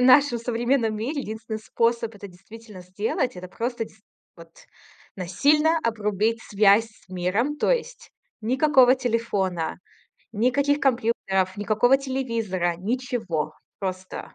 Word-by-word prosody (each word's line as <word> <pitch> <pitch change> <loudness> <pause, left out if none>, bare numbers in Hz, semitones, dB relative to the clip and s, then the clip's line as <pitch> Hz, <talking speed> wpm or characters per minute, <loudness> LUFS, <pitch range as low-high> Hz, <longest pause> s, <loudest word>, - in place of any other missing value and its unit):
в - - +3
нашем 255 -1 +6
современном 235 -1 0
мире 275 +7 -2
единственный 220 0 -5
способ 230 0 0
это 200 0 -9
действительно 210 +1 -13
сделать- 205 +5 -2
это 180 0 -8
просто, 235 +3 -3
действительно, 215 -1 -19 0.3
вот, - - -14 0.7
насильно 300 - +2
обрубить 220 0 0
связь 210 +2 +4
с 215 - -25
миром. 190 +11 -1
То - - +1
есть - - -2 0.3
никакого 260 +1 +5
телефона, 205 -10 -1 0.5
никаких 265 +6 +2
компьютеров, 220 -7 +1
никакого 220 +6 +3
телевизора, 230 -10 -2
ничего. 200 - -2 0.3
Просто. 185 -1 -5
225 Hz, 115 wpm, -24 LUFS, 195-255 Hz, 0.7 s, нашем